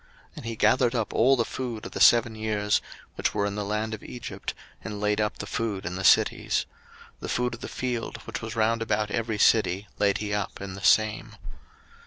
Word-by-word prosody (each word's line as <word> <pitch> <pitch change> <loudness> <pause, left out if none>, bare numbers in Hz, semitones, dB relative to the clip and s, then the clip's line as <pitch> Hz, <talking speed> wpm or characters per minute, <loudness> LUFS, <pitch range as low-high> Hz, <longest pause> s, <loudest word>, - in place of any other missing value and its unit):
01:041:048 - - -26
And - - -8
he 115 - -3
gathered 125 +2 +3
up 115 -3 -1
all 130 +4 +5
the 120 -3 +1
food 120 -4 -5
of - - -7
the - - -5
seven 115 -1 +6
years, 105 -1 0 0.3
which - - -1
were 100 -1 +1
in 100 - -2
the 105 0 -3
land 105 +2 -2
of 110 - -6
Egypt, 125 - -6 0.3
and 105 -1 -5
laid 105 +1 +1
up 105 - -1
the - - -5
food 110 -6 -3
in 90 +1 -3
the 95 - -4
cities: - - +3 0.5
the - - -6
food 125 0 0
of 120 - -8
the - - -5
field, 125 -2 -3
which 115 0 -5
was 110 0 -6
round 115 +1 +1
about 105 -1 0
every 115 -2 -1
city, 105 -2 +3
laid 100 -1 +3
he 105 -1 -3
up 105 -2 -3
in 100 -1 -6
the 95 - -8
same. 110 +3 +2
110 Hz, 220 wpm, -26 LUFS, 105-115 Hz, 0.5 s, seven